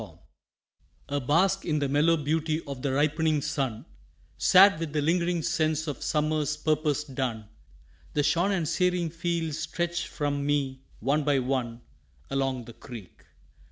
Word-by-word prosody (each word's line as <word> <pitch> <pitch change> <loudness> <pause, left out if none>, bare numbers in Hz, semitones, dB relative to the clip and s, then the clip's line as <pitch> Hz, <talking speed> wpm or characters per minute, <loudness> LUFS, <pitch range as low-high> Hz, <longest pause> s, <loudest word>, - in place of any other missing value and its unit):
FULFILMENT - - -11 0.9
A 145 0 0
bask 185 +9 +2
in 155 -3 0
the 145 -1 0
mellow 150 +4 +3
beauty 155 +1 0
of 140 -3 -6
the 140 - -1
ripening 155 +2 +2
sun, 135 -6 -2 0.5
Sad 195 -2 +6
with 165 -3 -4
the 150 - +1
lingering 170 +1 +1
sense 155 0 0
of 145 -3 -5
summer's 150 -1 0
purpose 150 -2 0
done, 125 -7 -4 0.6
The 145 - +1
shorn 175 +6 +2
and 175 -5 0
searing 180 0 +1
fields 165 -2 -2
stretch 175 0 -2
from 145 -2 -2
me 140 -2 -1 0.2
one 140 +6 +1
by 145 -1 +2
one 125 -2 -2 0.5
Along 135 -3 -1
the 120 - -11
creek. 115 -10 -12
150 Hz, 150 wpm, -27 LUFS, 135-165 Hz, 0.9 s, Sad